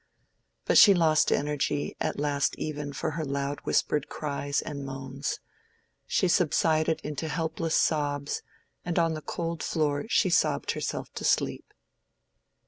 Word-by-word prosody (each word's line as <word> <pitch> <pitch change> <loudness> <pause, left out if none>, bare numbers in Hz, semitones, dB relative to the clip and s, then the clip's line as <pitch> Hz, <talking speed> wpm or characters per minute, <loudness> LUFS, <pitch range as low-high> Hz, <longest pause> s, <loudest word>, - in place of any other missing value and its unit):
But - - +6
she 205 -3 +9
lost 155 -3 +3
energy 145 0 0
at - - -1
last 145 -1 0
even 145 -2 -4
for 145 - -3
her 160 +1 -3
loud 140 0 -2
whispered 150 -1 +1
cries 145 -1 -2
and 140 -2 -5
moans: 135 +1 -4 0.7
she - - +2
subsided 160 -2 +2
into 150 +1 -4
helpless 160 +1 -1
sobs, 145 -2 0 0.4
and 175 -1 -3
on 165 -1 +3
the 155 - -5
cold 165 0 -4
floor 145 -3 0
she 190 -5 +3
sobbed - - +2
herself - - -4
to - - -6
sleep. - - 0
150 Hz, 135 wpm, -28 LUFS, 145-160 Hz, 0.7 s, she